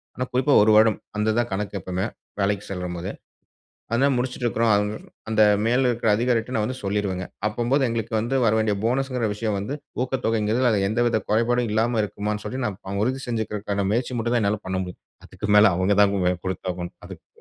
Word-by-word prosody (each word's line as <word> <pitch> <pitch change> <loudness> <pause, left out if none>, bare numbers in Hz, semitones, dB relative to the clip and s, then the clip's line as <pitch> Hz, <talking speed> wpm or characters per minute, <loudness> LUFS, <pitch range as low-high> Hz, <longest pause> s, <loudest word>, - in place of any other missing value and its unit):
ஆனா 125 - -2
குறிப்பா 130 +3 +2
ஒரு 110 +1 +5
வருடம். 110 0 +5 0.2
அந்த 105 +1 0
இதுதான் 120 +2 0
கணக்கு 100 +1 -3
எப்பவுமே! 90 +2 -3 0.3
வேலைக்கு 100 0 0
செல்லும்போது. 90 -1 -4 0.8
அதனால 135 +4 +3
முடிச்சுட்டு 125 0 -2
இருக்குறோம். 115 -1 +2 0.6
அந்த 110 -1 +2 0.2
மேல 125 +3 +3
இருக்கிற 115 -2 0
அதிகாரிகிட்ட 120 +1 0
நான் 105 - +1
வந்து 130 +3 -4
சொல்லிருவேங்க. 100 -2 -1 0.2
அப்பம்போது 120 +5 +1
எங்களுக்கு 115 0 -3
வந்து 120 +5 -1
வரவேண்டிய 110 -1 +2
போனஸ் 130 +4 +1
என்கிற 120 -4 0
விஷயம் 105 -1 -2
வந்து 105 +8 -4 0.3
ஊக்கத்தொகை 125 -3 -1
என்கிறது 115 +4 +2
அது 100 -3 +1
எந்தவித 115 0 +1
குறைபாடும் 120 +2 +2
இல்லாம 115 +2 +1
இருக்குமான்னு 105 +1 -3
சொல்லி 130 +1 -4
நான் 100 -2 -4
உறுதி 130 +3 -1
செஞ்சுக்கிறதுக்கான 105 -4 -2
முயற்சி 125 +3 -1
மட்டும் 120 +1 0
தான் 115 - +2
என்னால் 100 +1 0
பண்ண 95 0 -1
முடியும். 90 -1 -9 0.2
அதுக்கு 105 - -6
மேல 105 -2 +6
அவங்க 95 +2 +2
தான் 100 0 +2 0.3
பொறுப்பாகணும் 90 -1 -4
அதுக்கு. - - -12
110 Hz, 175 wpm, -24 LUFS, 100-120 Hz, 0.8 s, மேல